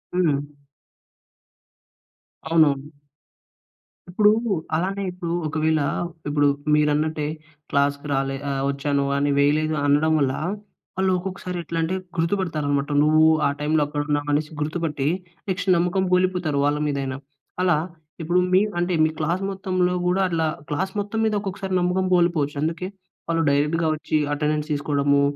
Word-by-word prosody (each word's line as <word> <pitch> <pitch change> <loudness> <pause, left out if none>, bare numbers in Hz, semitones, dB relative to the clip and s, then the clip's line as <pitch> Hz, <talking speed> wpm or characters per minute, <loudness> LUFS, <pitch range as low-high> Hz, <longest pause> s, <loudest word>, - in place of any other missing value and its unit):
హ్మ్. 165 -6 +3 2.1
అవునవును. 150 -3 +2 1.2
ఇప్పుడు 210 +4 +4 0.4
అలానే 195 +4 -1
ఇప్పుడు 175 -2 -4
ఒకవేళ 155 0 +1 0.5
ఇప్పుడు 145 0 +3 0.3
మీరన్నట్టే 150 0 +1 0.5
క్లాస్‌కి 140 +1 +1
రాలే 135 0 0
ఆహ్, 135 -1 -1
వచ్చాను 140 0 -1
అని 145 0 +1
వేయలేదు 155 +2 +2
అనడం 150 +2 +3
వల్ల 135 -2 +1 0.6
వాళ్ళు 190 0 +2
ఒక్కొక్కసారి 180 -1 -5
ఎట్లా 165 +1 -5
అంటే 165 +3 -1 0.2
గుర్తుపడతారన్నమాట. 155 -5 0
"నువ్వు 155 +1 +4 0.2
ఆ - - +2
టైమ్‌లో 150 +1 +1
అక్కడున్నావు" 145 0 -2
అనేసి 150 +2 0
గుర్తుపట్టి 150 -2 -2 0.4
నెక్స్ట్ 190 +1 -1
నమ్మకం 180 +2 +1
కోల్పోతారు 180 -5 +1
వాళ్ళ 145 0 +1
మీదైనా. 135 -2 -2 0.5
అలా 175 -4 +3 0.4
ఇప్పుడు 175 +3 +2
మీ 185 - +6 0.2
అంటే 175 +1 0
మీ 155 - +3
క్లాస్ 170 +4 0
మొత్తంలో 185 -2 0
కూడా 185 +2 +2
అట్లా 165 -2 0 0.2
క్లాస్ 190 +6 -1
మొత్తం 205 +2 -3
మీద 215 - +1
ఒక్కొక్కసారి 195 -1 -4
నమ్మకం 180 +1 +1
కోల్పోవచ్చు. 165 -5 +1
అందుకే 165 +3 -2 0.4
వాళ్ళు 165 -1 +1
డైరెక్ట్‌‌గా 150 +3 +1
వచ్చి 155 0 -1 0.2
అటెండెన్స్ 150 +1 -1
తీసుకోవడము 145 -1 +1
155 Hz, 125 wpm, -23 LUFS, 145-180 Hz, 2.1 s, మీ